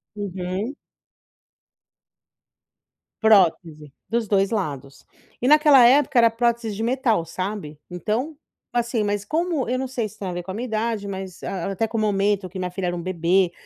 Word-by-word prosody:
Uhum. 195 +5 -4 2.5
Prótese. 165 -8 +3 0.2
Dos 230 -1 0
2 195 +1 +2
lados. 140 - -4 0.4
E, 250 - +1
naquela 295 -4 +7
época 260 0 +4
era 230 -1 +6
prótese 230 -2 -1
de 220 - -3
metal, 235 - +1
sabe. 185 -3 -5
Então, 225 - -3 0.3
assim 235 -2 0
mas 205 0 -2
como 325 -1 -1
eu 255 +1 -1
não 265 - -2
sei 240 -4 -2
se - - -17
tem 195 - -4
a 180 - -3
ver 175 0 -4
com 190 - -6
a - - -5
minha 235 +4 -4
idade, 220 -2 -2
mas 190 -2 -7
a 195 0 -3
até 220 +4 -1
com 225 - -4
o - - +1
momento 200 -2 +1
que 185 +1 -8
minha 180 -1 -2
filha 180 -1 -3
era 175 - -1
um 170 - -4
bebê. 180 +1 +1
205 Hz, 175 wpm, -23 LUFS, 185-235 Hz, 2.5 s, naquela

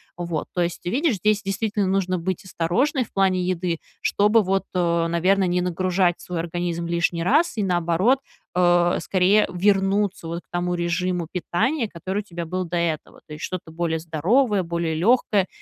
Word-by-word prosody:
Вот. 170 -3 -3
То 180 - 0
есть 170 0 -2
ты 175 - -3
видишь, 280 0 +1
здесь, 210 +2 +1
действительно, 205 0 -1
нужно 185 -1 0
быть 185 +2 -3
осторожной 235 - 0
в - - -23
плане 190 -2 +2
еды, 180 -2 -1 0.2
чтобы, 210 +2 +3
вот, 195 +1 0
э, 170 -2 +1
наверно, 185 +4 +2
не 180 0 +1
нагружать 180 0 0
свой 180 -2 -4
организм 170 0 -3
лишний 170 0 0
раз, 295 - +2
и 210 - +1
наоборот, 180 +7 +2 0.3
э, 175 -1 +3
скорее 190 +4 +3
вернуться 195 0 +1
вот 170 +1 -4
к - - -52
тому 175 0 -1
режиму 175 0 -1
питания, 225 - 0
который 190 +3 -4
у - - -1
тебя 175 -4 -6
был 185 +3 -3
до 170 +1 -5
этого. 170 -3 -2
То 150 - -10
есть, 150 - -8
что-то 180 -3 -6
более 165 0 -1
здоровое, 190 - +1
более 170 -1 -2
легкое. 200 +2 +2
180 Hz, 175 wpm, -23 LUFS, 170-195 Hz, 0.3 s, чтобы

